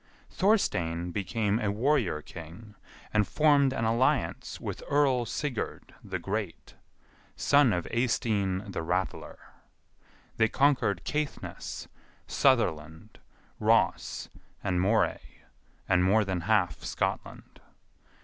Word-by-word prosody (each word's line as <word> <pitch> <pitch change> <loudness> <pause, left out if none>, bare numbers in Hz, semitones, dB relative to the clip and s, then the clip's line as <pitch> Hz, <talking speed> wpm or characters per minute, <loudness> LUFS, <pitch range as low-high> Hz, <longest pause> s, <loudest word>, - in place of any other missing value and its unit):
Thorstein 90 - +1
became 105 +3 -1
a 105 - 0
warrior 110 - +1
king, 90 +6 -11 0.4
and 105 -1 +3
formed 145 -3 +4
an 115 - -1
alliance 120 - 0
with - - -5
Earl 135 -4 +2
Sigurd 140 -7 -4
the - - -4
Great, - - -5 0.6
son 145 -4 +4
of 90 -3 -1
Eystein 105 -5 0
the 95 - -3
Rattler. 90 +3 -3 1.0
They 110 - +4
conquered 130 - +2
Caithness, 150 -1 -4 0.4
Sutherland, 80 - 0 0.4
Ross, - - +1 0.4
and 90 -3 0
Moray, 100 -2 0 0.4
and 90 0 +3
more 105 +3 +3
than 95 -3 -2
half 105 -5 +2
Scotland. - - -4
105 Hz, 100 wpm, -28 LUFS, 90-130 Hz, 1.0 s, formed